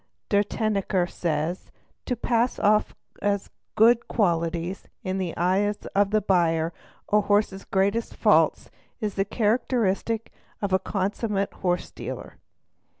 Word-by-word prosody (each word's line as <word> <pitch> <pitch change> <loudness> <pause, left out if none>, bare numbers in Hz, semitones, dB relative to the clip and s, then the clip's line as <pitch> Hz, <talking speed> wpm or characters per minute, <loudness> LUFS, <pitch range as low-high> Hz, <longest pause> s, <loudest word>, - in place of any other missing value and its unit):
De 205 0 +4
Tennecker 200 -4 0
says:—' 165 +1 -2 0.4
To 250 - 0
pass 235 +1 +1
_ - - -6
off 210 +1 +3 0.3
as 200 -1 -1 0.2
good 230 +2 +5
qualities 170 -2 -1 0.2
in 190 +1 -2
the 180 -3 -3
eyes 195 +4 +1
of 200 0 +3
the 215 +1 +2
buyer 165 -4 +2 0.4
a 210 - +6
horse's 205 -1 +1
greatest 200 +4 0
faults - - +3 0.3
is 210 -2 -2
the 195 0 0
characteristic 225 0 0 0.3
of 200 -2 -2
a 190 - +4
consummate 200 +1 -1
horse 180 -2 -1
dealer''. - - -7
200 Hz, 130 wpm, -25 LUFS, 185-215 Hz, 0.4 s, a